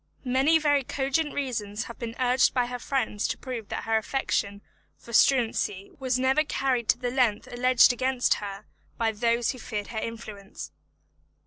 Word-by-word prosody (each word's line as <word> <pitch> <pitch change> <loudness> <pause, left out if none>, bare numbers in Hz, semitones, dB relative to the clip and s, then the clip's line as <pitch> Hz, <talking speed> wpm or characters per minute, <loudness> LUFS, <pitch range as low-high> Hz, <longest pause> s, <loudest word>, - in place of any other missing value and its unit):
Many 265 +6 +4
very 290 -3 +2
cogent 280 +4 -1
reasons 225 -6 -3
have 235 - -10
been 230 -1 -5
urged 255 +1 +3
by 250 -1 +2
her 245 0 -5
friends 235 -6 -1
to - - -3
prove 240 -5 -6
that - - -4
her 225 0 +1
affection 205 -4 -2 0.3
for 235 - -13
Struensee 225 -6 +2
was 260 -2 0
never 265 +4 +2
carried 260 -6 -1
to - - +4
the 245 0 -3
length 245 -5 +1
alleged 250 0 +4
against 255 0 +1
her 200 -1 -7 0.3
by 225 -1 +1
those 230 +2 +1
who 255 - -9
feared 210 -3 -5
her 220 - -3
influence. 215 -3 -7
245 Hz, 165 wpm, -27 LUFS, 220-265 Hz, 0.3 s, Many